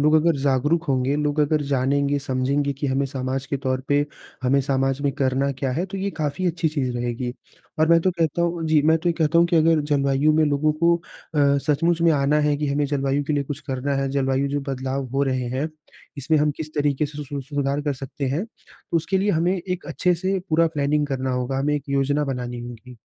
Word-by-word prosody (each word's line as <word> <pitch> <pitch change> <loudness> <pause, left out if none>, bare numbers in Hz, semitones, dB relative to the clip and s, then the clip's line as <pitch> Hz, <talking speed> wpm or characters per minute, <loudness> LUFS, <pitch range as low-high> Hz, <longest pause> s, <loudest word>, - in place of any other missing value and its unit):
लोग 150 +2 +4
अगर 160 0 +4
जागरूक 145 +5 +1
होंगे, 135 +1 +1
लोग 150 0 -1
अगर 150 +1 +2
जानेंगे 140 +1 +1
समझेंगे 140 +1 0
कि 140 +1 -4
हमें 135 +1 0
समाज 135 0 -3
के 140 - -2
तौर 130 -1 -1
पे, 145 0 +3 0.4
हमें 135 +2 +3
समाज 135 0 0
में 140 - +2
करना 135 +1 0
क्या 135 -2 -1
है 170 +7 -1
तो 195 +1 -6
ये 200 +1 -1
काफ़ी 155 +4 -1
अच्छी 165 -1 0
चीज़ 135 -5 -2
रहेगी। 120 +1 -3 0.5
और 155 - +3
मैं 170 0 +6
तो 185 +2 +2
कहता 170 -1 0
हूँ 170 -1 -1
जी। 155 -1 +4
मैं 160 0 +5
तो 175 +2 -1
ये - - +3
कहता 160 +1 +3
हूँ 170 - +5
कि 170 -1 +1
अगर 160 0 +4
जलवायु 140 +1 +3
में 155 0 +3
लोगों 150 +1 +2
को 170 +2 +3 0.4
अ, 140 -1 +4
सचमुच 165 +3 +2
में 170 0 +5
आना 145 +1 +2
है 150 -1 +2
कि 150 0 -2
हमें 145 +1 +1
जलवायु 140 0 0
के 150 - -1
लिए 145 -1 0
कुछ 145 +1 -5
करना 135 +2 -1
है, 135 0 0
जलवायु 135 0 0
जो 145 +1 -1
बदलाव 135 0 -2
हो 140 - +2
रहे 130 -2 -1
हैं, 135 +5 -2 0.5
इसमें 150 +3 +1
हम 150 0 +3
किस 155 -1 -7
तरीके 145 0 +1
से 150 +1 -10
सु 150 - -4
सु 140 +1 -5
सुधार 140 0 0
कर 145 -1 0
सकते 135 +1 -5
हैं। 165 - -1 0.5
उसके 185 +4 0
लिए 205 +2 +1
हमें 170 +2 +2
एक 180 0 -5
अच्छे 180 -1 +1
से 190 +3 -1
पूरा 165 +1 +4
प्लानिंग 145 +1 +1
करना 130 -2 -2
होगा। 125 +1 -1
हमें 150 +2 +1
एक 145 - -3
योजना 140 +2 +1
बनानी 125 -3 -4
होगी। 120 0 -12
145 Hz, 230 wpm, -23 LUFS, 135-155 Hz, 0.5 s, मैं